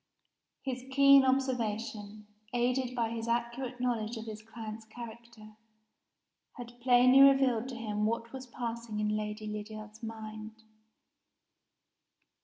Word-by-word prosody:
His 255 -2 -4
keen 275 0 +7
observation, 225 -5 -1 0.3
aided 250 +1 0
by 230 -2 0
his 230 0 -4
accurate 240 +2 -2
knowledge 235 -2 -1
of 225 - -7
his 215 -1 -7
client's 220 0 -8
character, 225 -1 -11 1.0
had 240 0 -10
plainly 255 +2 +6
revealed 265 -3 +5
to 255 - -6
him 210 -2 -1
what 230 +1 -3
was 260 -1 -7
passing 235 -3 -5
in 210 0 0
Lady 215 0 -4
Lydiard's 215 +1 -7
mind. 220 0 -8
230 Hz, 115 wpm, -31 LUFS, 215-250 Hz, 1.0 s, keen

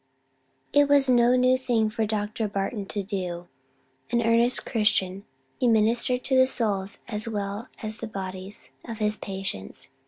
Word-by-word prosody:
It 290 0 +5
was 280 -2 +5
no 245 0 +5
new 255 0 +3
thing 230 -4 +1
for 220 0 -1
Dr. 215 +1 -2
Barton 200 +1 -3
to 205 0 -3
do: 180 -3 -4 0.6
an 235 -1 +2
earnest 230 +2 +3
Christian, 200 -3 0 0.3
he 250 - +2
ministered 235 +3 +3
to 265 - +2
the 260 0 +6
souls 205 -6 0
as 215 0 -2
well 205 +2 -4 0.2
as 215 +1 -3
the - - -5
bodies 190 -7 -7
of 230 - -7
his 210 -1 0
patients. 190 - -6
215 Hz, 155 wpm, -26 LUFS, 195-240 Hz, 0.6 s, the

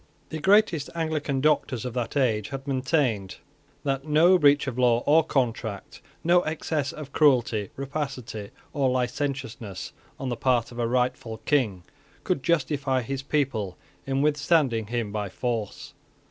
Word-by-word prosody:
The 160 - -4
greatest 190 -3 +3
Anglican 155 -4 -1
doctors 145 -4 +1
of 125 - -4
that 120 +2 -2
age 110 -6 +1
had 135 0 -6
maintained 130 - 0 0.5
that 135 -1 -1
no 160 +5 +5
breach 145 -1 +5
of 130 -2 -4
law 120 -1 +3
or 160 +3 +5
contract, 115 -8 -2 0.2
no 175 +1 +5
excess 155 -3 -2
of 145 -3 -9
cruelty, 120 -8 +3
rapacity, 135 -7 -5 0.2
or 140 -3 +2
licentiousness, 125 -5 -3 0.3
on 135 - -3
the 120 - -1
part 125 -2 +1
of 120 - -8
a 120 - +1
rightful 125 -1 -1
King, 110 -11 +1 0.4
could 140 - 0
justify 140 -4 +1
his 135 +3 -3
people 135 -10 -1 0.3
in 135 +1 +1
withstanding 145 -6 +2
him 115 -2 -2
by 105 -1 -3
force. 115 0 -4
135 Hz, 145 wpm, -26 LUFS, 120-145 Hz, 0.5 s, no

